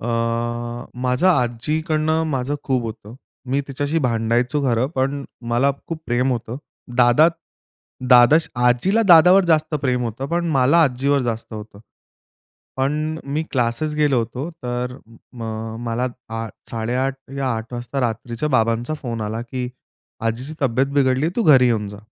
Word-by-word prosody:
अ, 120 - -4 0.9
माझं 125 +7 +1
आज्जीकडनं 155 +4 +1
माझं 135 +1 -1
खूप 130 -3 0
होतं. 110 0 -8 0.4
मी 135 +2 +2
तिच्याशी 145 +4 -1
भांडायचो 120 +4 0
खरं, 125 -1 +1
पण 135 +1 -1 0.3
मला 125 +4 +3 0.2
खूप 160 -1 -5
प्रेम 125 +2 +1
होतं, 120 0 -4 0.4
दादा, 125 +6 +6 0.8
दादा 120 +5 +8 0.3
आजीला 185 - +3
दादावर 180 +3 +7
जास्त 155 -2 +2
प्रेम 125 -2 +1
होतं, 120 +4 -4
पण 170 0 -1
मला 140 +6 +5
आजीवर 135 +2 +1
जास्त 115 -1 -4
होतं. 105 -1 -9 1.0
पण 150 +4 -1
अ, - - -15
मी 155 +2 0
क्लासेस 125 +4 0
गेलो 150 -4 +2
होतो, 125 +6 -3
तर 125 -5 -4 0.4
म 120 -3 -9 0.4
मला 120 +2 -1 0.3
आ 115 0 -3 0.2
8:30 125 +4 -1 0.2
या 135 -1 0
8:00 110 +2 -7
वाजता 120 +3 -4
रात्रीच्या 120 +3 -2
बाबांचा 115 +1 +1
फोन 115 -3 -4
आला, 110 +2 -3
की 125 +1 -4 0.6
"आजीची 125 +7 -3
तब्येत 130 +1 +2
बिघडली, 135 +1 +2
तू 235 - +2
घरी 130 -7 +6
येऊन 110 -4 +1
जा." 100 0 -9
130 Hz, 145 wpm, -21 LUFS, 120-150 Hz, 1.0 s, दादा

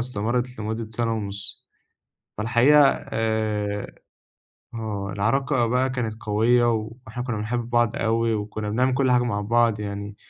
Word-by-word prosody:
استمرّت 125 +1 -2
لمدة 110 +1 -4
سَنة 115 0 -1
ونُص. 100 -1 -5 0.7
فالحقيقة 125 +7 +5
آآ 110 -4 -1 0.9
آه، 105 -3 -4
العلاقة 120 +5 +1
بقى 125 +2 +1
كانت 115 -4 -4
قوية 115 +3 +3
و 110 0 -3 0.2
وإحنا 125 +3 -5
كُنّا 120 -4 -3
بنحب 115 +2 -3
بعض 120 -2 +2
أوي 115 0 +1
وكُنّا 105 0 -3
بنعمل 125 +4 +1
كل 130 -1 +2
حاجة 125 0 +4
مع 105 -4 -1
بعض 115 0 +2
يعني، 100 0 -5
115 Hz, 140 wpm, -24 LUFS, 105-120 Hz, 0.9 s, فالحقيقة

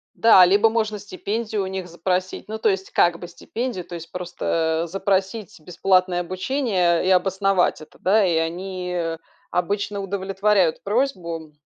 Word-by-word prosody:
Да, 220 -5 +7
либо 205 +4 +4
можно 215 -2 -1
стипендию 210 +2 -3
у 190 - -4
них 190 -1 -5
запросить. 180 +3 -2
Ну, 220 +1 -4
то 220 0 +2
есть, 190 0 -2
как 175 -1 +3
бы 175 - -7
стипендию, 220 +2 -5
то 175 - -8
есть 165 0 -9
просто, 165 -2 -1
э, - - -8
запросить 195 +1 -2
бесплатное 180 +1 +1
обучение 185 -2 0
и - - +3
обосновать 190 -1 +2
это. 155 - -14
Да, 205 +2 +3
и 175 -3 +1
они, 180 +2 -3
э, 165 -2 -2 0.3
обычно 200 +3 -1
удовлетворяют 195 -2 0
просьбу, 180 - -2
190 Hz, 155 wpm, -22 LUFS, 175-205 Hz, 0.3 s, Да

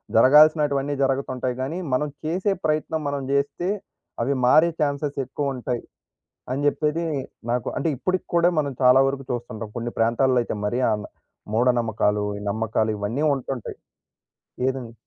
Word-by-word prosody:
జరగాల్సినటివన్నీ 145 +2 +5
జరగుతుంటాయి 130 -2 -1
గానీ, 140 +6 -3 0.2
మనం 150 +4 +1 0.2
చేసే 185 +5 0
ప్రయత్నం 155 +1 0
మనం 140 -1 -2
చేస్తే, 140 +6 0 0.5
అవి 130 +4 +1
మారే 155 +7 +6
ఛాన్సెస్ 145 0 -1
ఎక్కువుంటాయి 130 -2 -3 0.7
అని 140 +2 -2
చెప్పేది 150 +3 +1 0.5
నాకు 120 -1 -1
అంటే 145 - 0
ఇప్పడికి 185 +8 -1
కూడా 170 0 +5
మనం 145 -2 0
చాలా 125 +1 +7
వరకు 135 0 -2
చూస్తుంటాం. 115 -3 -4
కొన్ని 120 0 -3
ప్రాంతాల్లో 120 +3 +3
అయితే 115 - -4
మరి 120 +5 0
ఆన్ 105 -1 -2 0.5
మూఢనమ్మకాలు, 110 -3 +2
ఈ - - -9
నమ్మకాలు 110 +1 0
ఇవన్నీ 110 +8 -2
ఉంటుంటాయి. 130 -3 -5 0.9
ఏదండి? 130 -3 -4
135 Hz, 130 wpm, -24 LUFS, 120-150 Hz, 0.9 s, చాలా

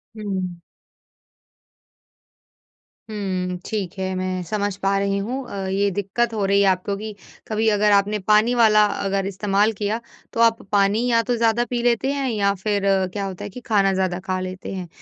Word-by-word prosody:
हुँ। 190 -5 -4 2.5
हुँ, 185 -4 -3
ठीक 200 -5 -3
है, 190 0 -2
मैं 185 0 -2
समझ 205 +2 -2
पा 195 0 +1
रही 200 0 0
हूँ 215 +6 -3
अ, 195 -1 -4
ये 200 +1 +1
दिक्कत 230 +4 0
हो 210 -3 0
रही 200 +1 +3
है 200 - +4
आपको 190 +2 0
कि 215 0 -7 0.3
कभी 220 0 0
अगर 210 0 +3
आपने 205 +1 +3
पानी 215 +4 +3
वाला 215 -3 +5
अगर 195 -1 -1
इस्तेमाल 200 +2 +1
किया 210 +2 -2 0.3
तो - - -4
आप 230 -1 +4
पानी 205 +3 +3
या 230 -1 +4
तो 245 - +3
ज़्यादा 230 +1 +2
पी 245 -1 -1
लेते 245 +3 +2
हैं 275 -2 -1
या 200 -2 +1
फिर 200 +1 -1 0.3
क्या 200 -1 -2
होता 190 -2 -6
है 205 - -5
कि 225 - -9
खाना 195 -3 +3
ज़्यादा 185 -1 0
खा 185 0 -1
लेते 185 +1 -6
हैं। 185 -2 -5
200 Hz, 180 wpm, -22 LUFS, 190-215 Hz, 2.5 s, वाला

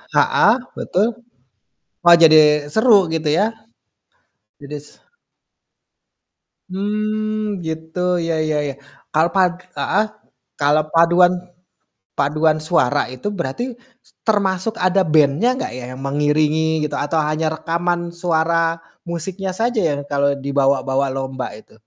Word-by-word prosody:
Heeh, - - +4 0.2
betul. 200 +5 0 1.0
Wah 175 0 +8
jadi 155 -1 +8 0.4
seru 220 0 +5 0.2
gitu 160 -1 -2
ya. 210 - +3 1.2
Jadi 145 +1 -7
s - - -17 1.8
Mmm, 215 +1 -2
gitu, 160 +2 -6 0.3
ya 165 - -1 0.2
ya 150 - 0
ya. - - -5 0.4
Kal 160 +2 +3
pad 180 -2 +3 0.2
heeh, 210 +3 +1 0.5
kalau 150 +2 +3
paduan 175 +2 +5 0.9
paduan 155 +2 +2
suara 145 -4 +1
itu, 130 +9 -7
berarti, 170 - -4 0.4
s - - -26 0.2
termasuk 200 0 0
ada 185 +1 +2
band-nya 150 - +3
enggak - - -4
ya, - - -8
yang 135 - -10
mengiringi 150 +2 +1
gitu, 150 -1 -3
atau 145 +3 -2
hanya 155 +1 -1
rekaman 170 +1 -2
suara 170 -1 0 0.5
musiknya 185 +3 -4
saja 235 +1 0
ya, 160 -6 +1 0.2
kalau 140 0 +1
dibawa-bawa 140 -1 +1
lomba 135 -1 -4
itu? 110 - -17
160 Hz, 120 wpm, -19 LUFS, 145-185 Hz, 1.8 s, Wah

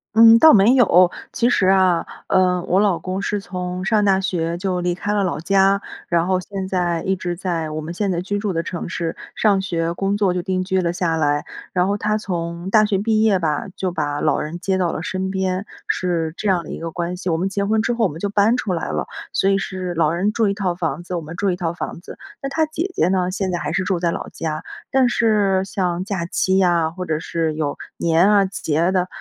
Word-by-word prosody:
嗯， 230 0 +9
倒 315 +6 +8
没 215 +5 +6
有。 185 -8 +5 0.2
其 240 +1 +1
实 195 - +2
啊， 185 -3 +3 0.2
呃， 180 -1 +2
我 185 - +3
老 195 -5 +2
公 185 +3 -4
是 205 - -1
从 180 -1 -5
上 210 0 +2
大 195 -1 +4
学 170 -3 -2
就 185 -1 -1
离 175 0 0
开 205 +4 -3
了 205 -1 +1
老 180 - -1
家， 195 +3 +3 0.3
然 170 0 +1
后 185 -1 +2
现 190 0 -5
在 175 -3 0
一 190 0 0
直 175 -1 -4
在 170 -4 -3
我 155 0 -4
们 155 - -6
现 200 -1 0
在 175 0 -1
居 205 +2 -2
住 205 -2 -2
的 165 - 0
城 175 0 -5
市， 165 -2 -3 0.2
上 205 -3 +3
学 170 -3 -1
工 195 +2 0
作 200 -3 +2
就 180 - -2
定 185 -1 -1
居 190 0 0
了 170 0 0
下 165 -2 0
来。 145 -1 +1 0.3
然 180 0 +1
后 205 - 0
他 215 +1 0
从 170 -2 -4
大 215 +1 +5
学 200 -2 0
毕 215 +1 +2
业 200 -4 +3
吧， 155 -3 -1
就 185 -1 -2
把 145 -3 -2
老 - - +2
人 165 +3 -5
接 190 +1 0
到 180 -2 +1
了 - - -4
身 190 +2 -3
边， 190 +1 -1 0.2
是 170 -3 -1
这 210 - -3
样 180 -3 +2
的 - - -11
一 - - -5
个 165 0 -5
关 175 +2 -3
系， 180 -1 -2
我 160 - +1
们 190 +3 -1
结 200 +1 -1
婚 220 +1 +2
之 230 - 0
后 230 -2 +2
我 - - +1
们 160 - -9
就 200 - -2
搬 210 +4 +3
出 215 -6 -2
来 165 -3 -2
了， 75 0 -2 0.2
所 195 - +2
以 195 - +3
是 185 -3 -4
老 160 -1 +2
人 190 +5 0
住 225 -1 +1
一 200 - +1
套 190 -4 -2
房 165 -3 -2
子， 180 +1 -5
我 170 - -2
们 160 +2 -8
住 200 +2 0
一 180 - 0
套 170 -2 -2
房 170 - -6
子。 - - -11 0.2
那 - - -1
他 315 +2 +1
姐 330 +5 -3
姐 - - +2
呢， 185 -1 +1
现 190 -1 -2
在 175 - -1
还 150 -1 -3
是 185 +2 0
住 180 -2 -1
在 170 -1 +1
老 - - -5
家， 155 -1 -4 0.3
但 260 -2 +4
是 205 -5 +2
像 180 -2 -2
假 195 -4 -2
期 190 +1 +1
呀， 170 -3 +2
或 180 +2 -6
者 155 -3 -1
是 160 -2 -2
有 150 -2 -2 0.2
年 170 +3 +3
啊、 200 -2 +5
节 160 -5 -2
啊 170 +3 +2
的， 185 -1 +1
185 Hz, 270 characters per minute, -21 LUFS, 170-200 Hz, 0.3 s, 嗯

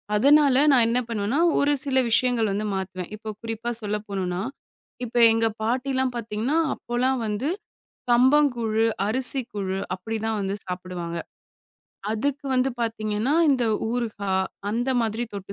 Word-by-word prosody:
அதனால 280 +4 +5 0.2
நான் 250 -4 +5
என்ன 240 +2 +2
பண்ணுவேன்னா, 225 +5 -1 0.2
ஒரு 290 +1 +3
சில 265 -2 0
விஷயங்கள் 230 -3 +2
வந்து 210 +2 -2
மாத்துவேன். 190 -1 -5
இப்போ 220 0 -8
குறிப்பா 230 +1 -4
சொல்லப்போணும்னா, 200 -4 -3 0.6
இப்போ 240 +1 -1
எங்க 225 0 +2 0.2
பாட்டில்லாம் 260 +2 0
பாத்தீங்கன்னா, 230 +6 -1 0.2
அப்போலாம் 255 +2 -1
வந்து 215 +7 -1 0.6
கம்பங்கூழு, 240 -3 +3 0.2
அரிசி 260 +4 0
கூழு 195 -2 -3 0.2
அப்படி 205 +5 -5
தான் 225 -1 0
வந்து 195 0 -2
சாப்பிடுவாங்க. 180 -2 -5 1.0
அதுக்கு 280 +6 -2
வந்து 255 +1 +2
பாத்தீங்கன்னா, 220 +2 -1 0.2
இந்த 255 -3 +2 0.3
ஊறுகா 220 -5 -2 0.4
அந்த 240 +4 -1
மாதிரி 225 +1 -1
தொட்டு 200 -1 -7
225 Hz, 130 wpm, -24 LUFS, 205-255 Hz, 1.0 s, அதனால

